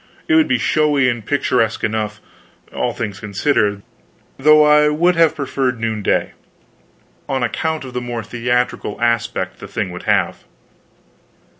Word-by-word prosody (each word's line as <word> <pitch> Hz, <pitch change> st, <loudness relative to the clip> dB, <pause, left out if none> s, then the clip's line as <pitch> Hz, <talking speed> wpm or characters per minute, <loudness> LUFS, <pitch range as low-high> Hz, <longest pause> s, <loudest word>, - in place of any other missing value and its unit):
It 330 Hz, -, +2 dB
would 320 Hz, -1 st, +5 dB
be -, -, +2 dB
showy 150 Hz, -4 st, +2 dB
and 120 Hz, -3 st, -3 dB
picturesque 125 Hz, -3 st, 0 dB
enough, 110 Hz, -1 st, -2 dB, 0.5 s
all -, -, -1 dB
things 105 Hz, -5 st, -5 dB
considered, 105 Hz, 0 st, 0 dB, 0.5 s
though 150 Hz, +2 st, +5 dB
I 150 Hz, 0 st, +5 dB
would 175 Hz, +4 st, +2 dB
have 165 Hz, -1 st, +3 dB
preferred 135 Hz, -4 st, -2 dB
noonday, 110 Hz, -2 st, -1 dB, 1.0 s
on 130 Hz, -2 st, -1 dB
account 160 Hz, +4 st, -2 dB
of 130 Hz, -, -9 dB
the 125 Hz, -, -3 dB
more 120 Hz, -2 st, -4 dB
theatrical 120 Hz, -1 st, -2 dB
aspect 115 Hz, -5 st, -1 dB
the 100 Hz, -, -9 dB
thing 100 Hz, -1 st, -3 dB
would 90 Hz, -, -7 dB
have. -, -, +1 dB
120 Hz, 140 wpm, -18 LUFS, 110-150 Hz, 1.0 s, would